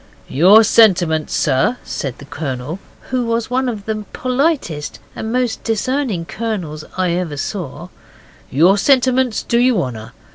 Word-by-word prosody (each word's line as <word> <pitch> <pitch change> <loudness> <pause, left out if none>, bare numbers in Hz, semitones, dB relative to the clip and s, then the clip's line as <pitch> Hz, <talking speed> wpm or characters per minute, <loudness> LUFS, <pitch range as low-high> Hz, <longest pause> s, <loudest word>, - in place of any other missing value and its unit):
'Your 190 +10 +6
sentiments, 175 -8 +3
Sir,' 145 - +1
said 135 -4 -5
the 145 - -12
Colonel 145 +2 -5 0.3
who 255 -1 +1
was 230 0 -2
one 260 0 +1
of 210 -4 -6
the 215 -1 -3
politest 255 - -1 0.2
and 220 - -4
most 245 -2 -1
discerning 225 -4 -1
colonels 185 -8 -4
I 185 -2 +1
ever 170 -4 -2
saw, 170 0 -5 0.6
'your 175 +9 +4
sentiments 255 -1 +2
do 235 - +1
you 245 -4 +3
honour. 115 -8 -5
205 Hz, 140 wpm, -18 LUFS, 155-245 Hz, 0.6 s, Your